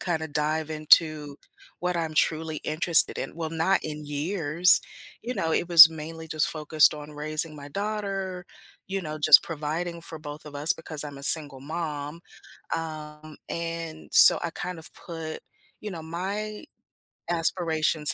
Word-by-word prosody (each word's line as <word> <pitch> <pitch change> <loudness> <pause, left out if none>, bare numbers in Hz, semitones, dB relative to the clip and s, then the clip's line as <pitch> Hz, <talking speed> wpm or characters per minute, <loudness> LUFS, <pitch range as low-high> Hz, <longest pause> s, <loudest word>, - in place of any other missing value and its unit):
kinda 160 -3 -2
dive 155 +1 -2
into, 155 -1 +3 0.4
what 180 0 -1
I'm 160 -2 -3
truly 155 0 0
interested 160 +1 +2
in. - - -5
Well, 160 -1 -5
not 165 +4 +1
in 150 -1 -6
years, 160 +3 +2 0.4
you 245 +2 -4
know, 160 -7 -1
it 170 - 0
was 170 -2 +11
mainly 160 +1 -8
just 155 0 0
focused 155 0 +3
on 150 0 -9
raising 155 +1 -3
my 145 0 -10
daughter, 195 -1 -4 0.4
you 195 0 -2
know, 155 -2 -6
just 150 -1 +7
providing 165 +2 -4
for 160 -1 -9
both 150 0 -9
of 150 -1 -11
us 150 +4 +2
because 155 -2 -5
I'm 145 -1 -8
a - - -12
single 145 -3 +3
mom, 150 0 -5 0.6
um, 155 -1 -8
and, 165 -1 -5
so - - +9
I 170 - -2
kind 180 0 -6
of 160 - -11
put, 165 -2 -7 0.4
you 210 - -6
know, 165 -3 -7
my 200 +6 -5 0.7
aspirations 160 -3 +1
160 Hz, 155 wpm, -26 LUFS, 150-170 Hz, 0.7 s, was